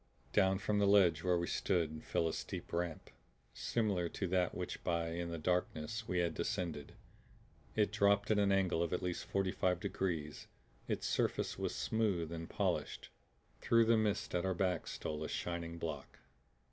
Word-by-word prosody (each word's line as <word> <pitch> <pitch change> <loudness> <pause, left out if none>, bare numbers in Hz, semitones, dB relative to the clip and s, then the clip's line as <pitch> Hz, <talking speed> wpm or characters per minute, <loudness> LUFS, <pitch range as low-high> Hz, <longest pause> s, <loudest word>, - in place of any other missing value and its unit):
Down 95 -1 +4
from 105 +1 0
the 100 - +4
ledge 90 -5 +5
where 90 -1 +3
we 85 - 0
stood 80 -4 0
fell 85 - 0
a 80 - -1
steep - - -6
ramp, 85 -1 -3 0.4
similar 100 -7 0
to 95 - -3
that 90 -1 +2
by - - -8
which, 90 -1 -4
in 85 0 -1
the 85 - -3
darkness, 90 +5 -1
we 90 - -1
had 85 -1 +1
descended. 85 -6 -3 0.8
It 105 -2 +2
dropped 100 0 +3
at 105 - +4
an 100 -1 +3
angle 95 -4 +2
of 85 0 0
at 90 - -1
least 90 -1 -2
forty 95 -1 0
five 90 -1 +1
degrees; 80 -6 -3 0.4
its - - -2
surface - - 0
was - - -2
smooth 100 -8 0
and 80 0 -5
polished. - - -1 0.5
Through 115 0 +4
the 115 +1 +5
mists 110 -3 0
at 90 -1 +1
our 95 -1 0
back 90 -2 0
stole 75 0 -4
a - - -4
shining 85 -1 -3
block. 80 -5 -5
90 Hz, 175 wpm, -36 LUFS, 85-100 Hz, 0.8 s, ledge